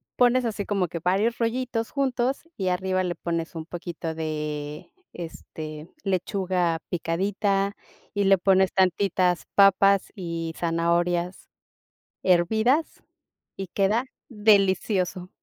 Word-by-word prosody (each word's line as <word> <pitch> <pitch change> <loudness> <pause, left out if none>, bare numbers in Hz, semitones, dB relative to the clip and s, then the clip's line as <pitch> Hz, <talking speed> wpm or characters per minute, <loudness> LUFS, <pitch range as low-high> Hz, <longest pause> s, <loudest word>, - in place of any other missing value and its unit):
pones 250 0 +4
así 205 -3 -2
como 195 -3 0
que 170 - -5
varios 195 +8 +1
rollitos 230 -1 -1
juntos 265 +1 -1
y 190 - -2
arriba 185 +1 0
le 175 -1 -2
pones 170 0 -3
un 160 -1 -5
poquito 170 -1 -5
de, 150 -2 -4 0.2
este, 155 -2 -8
lechuga 185 -3 0
picadita 195 +4 0 0.4
y 205 -1 +1
le 195 0 +6
pones 190 +1 +3
tantitas 185 -1 +2
papas 195 0 +5
y 165 -3 -4
zanahorias 170 +1 0 0.7
hervidas 220 - +2 0.5
y 195 -1 -5
queda 210 +7 +1 0.2
delicioso. 195 -4 +2
185 Hz, 110 wpm, -25 LUFS, 170-205 Hz, 0.7 s, le